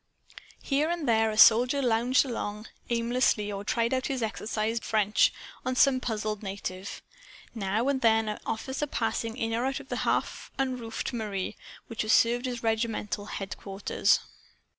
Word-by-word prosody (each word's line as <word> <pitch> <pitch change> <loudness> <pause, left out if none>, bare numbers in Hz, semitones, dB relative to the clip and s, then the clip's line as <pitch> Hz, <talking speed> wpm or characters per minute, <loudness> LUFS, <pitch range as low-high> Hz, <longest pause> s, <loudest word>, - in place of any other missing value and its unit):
Here 290 +3 +1
and 340 -3 -2
there 225 -1 +3
a 215 - -4
soldier 245 +6 +7
lounged 245 +1 +3
along 215 -3 -4 0.2
aimlessly 235 -3 +1
or 200 0 -5
tried 230 +3 0
out 260 0 0
his 260 -3 -2
exercise 220 +1 -2
book - - -12
French 210 -1 +3 0.3
on 255 - -1
some 260 0 +5
puzzled, 215 -3 -3
native. 195 -1 -6 0.5
Now 215 +3 -1
and 275 -2 +1
then 225 -1 +4
an 210 - -3
officer 265 +6 -3
passed 225 -4 -1
in 225 0 -3
or 235 +2 0
out 270 +1 -1
of 275 -1 -13
the - - -2
half - - -1
unroofed 255 -3 -3
mairie 210 -5 -3 0.3
which 230 - -3
served 240 +3 +4
as 245 -2 -5
regimental 220 -3 -1
headquarters. 195 0 0
225 Hz, 155 wpm, -28 LUFS, 215-255 Hz, 0.5 s, soldier